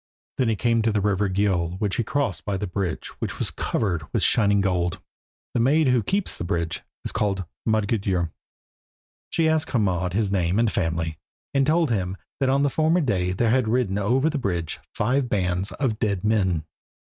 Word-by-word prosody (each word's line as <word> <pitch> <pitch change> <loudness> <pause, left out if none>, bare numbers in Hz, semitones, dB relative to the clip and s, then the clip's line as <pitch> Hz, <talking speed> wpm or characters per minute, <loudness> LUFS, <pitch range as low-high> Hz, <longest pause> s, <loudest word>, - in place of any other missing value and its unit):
Then 125 -3 +3
he 110 - +2
came 115 +1 +2
to 110 0 +2
the 105 - +1
river 100 0 +1
Gjöll 95 -2 0
which 100 -3 -1
he 120 - +1
crossed 110 - -1
by 100 +2 -2
the 105 - -3
bridge 90 -2 -3
which - - -4
is - - -1
covered 90 -7 -1
with - - 0
shining 100 -3 +4
gold. 90 -1 0 0.5
The - - +1
maid 140 +4 +4
who 125 -2 +3
keeps 195 - -1
the - - -5
bridge 85 -3 -2 0.2
is - - 0
called 95 -3 -1 0.2
Modgudur. 100 -6 +1 1.0
She 165 -1 +2
asked 160 0 +1
Hermod 90 -6 +1
his 105 -1 +1
name 90 -1 +1
and 115 -1 +3
family, 80 -3 -1 0.3
and 135 -1 +3
told 160 -2 +3
him 95 -3 -1 0.2
that 135 -2 +2
on 135 +1 +3
the 145 - +2
former 160 +4 +2
day 90 - 0
there 110 +5 +1
had 125 -2 +2
ridden 110 -4 +1
over 125 +8 +2
the 160 -2 0
bridge 85 - -2
five 125 +4 0
bands 95 -1 0
of 120 -6 -1
dead 100 -5 0
men. 95 -7 +1
105 Hz, 190 wpm, -24 LUFS, 90-125 Hz, 1.0 s, shining